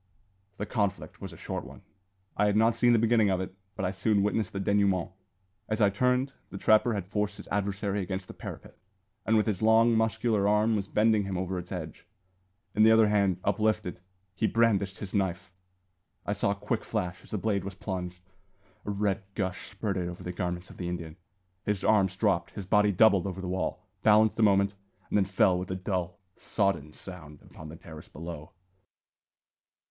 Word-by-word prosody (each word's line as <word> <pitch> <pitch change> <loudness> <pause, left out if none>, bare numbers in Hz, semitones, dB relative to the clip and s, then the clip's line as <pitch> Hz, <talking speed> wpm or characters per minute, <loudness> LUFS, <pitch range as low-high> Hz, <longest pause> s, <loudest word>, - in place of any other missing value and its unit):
The 105 - -3
conflict 105 -4 -2
was - - -6
a - - -12
short - - -4
one. - - -12 0.5
I 105 - +3
had 105 - +1
not 115 +1 +4
seen 120 +1 +4
the 120 - +5
beginning 115 -2 +3
of 95 -1 +1
it, 95 0 -5 0.2
but 95 - -2
I 90 - 0
soon 100 +1 +1
witnessed 105 -1 0
the 100 - -4
denouement. 95 -2 +1 0.6
As 110 - -1
I 100 -2 +4
turned, 125 +5 +1 0.2
the - - -7
trapper 110 +3 +4
had 100 -3 -3
forced 105 +2 -2
his - - -11
adversary 100 0 -1
against 95 0 -4
the - - -9
parapet, - - -9 0.5
and 110 0 +4
with 105 - +3
his 105 -3 -1
long, 115 +1 +5
muscular 110 -2 +1
arm 105 +2 +3
was 100 -2 -2
bending 110 -1 +2
him 95 -2 -3
over 95 0 -2
its 90 0 -10
edge. 80 -2 -7 0.7
In 110 - +2
the 110 - +7
other 110 -1 +6
hand, 100 -4 +2
uplifted, 105 -3 0 0.3
he 110 +3 0
brandished 100 -5 +2
his 100 -3 -7
knife! 95 -3 -1 0.7
I 100 - 0
saw 100 - 0
a 100 - +1
quick 100 - -2
flash 90 0 -3
as - - -15
the 105 - -2
blade 100 0 0
was 100 0 -6
plunged; 90 -2 -5 0.6
a - - -4
red 100 -1 0
gush 95 -2 -3
spurted 95 -5 -2
over 90 - -9
the 90 - -4
garments 90 0 -4
of - - -14
the 90 -1 -4
Indian; 85 -3 -5 0.5
his 105 -2 -1
arms 95 -4 +3
dropped, 95 -4 0
his 100 - -5
body 105 +2 +3
doubled 100 -1 +4
over 95 -1 -5
the 95 - -5
wall, 90 +1 -3 0.2
balanced 110 +1 +4
a - - +3
moment, 100 -1 +4 0.4
and - - 0
then 100 -2 +4
fell 95 -1 +3
with 90 - -6
a 95 - -2
dull, 90 -1 -3 0.2
sodden 85 -8 -1
sound 75 -3 -10
upon 80 - -11
the 80 - -9
terrace 80 -3 -12
below! 85 +2 -8
100 Hz, 195 wpm, -28 LUFS, 90-105 Hz, 0.7 s, the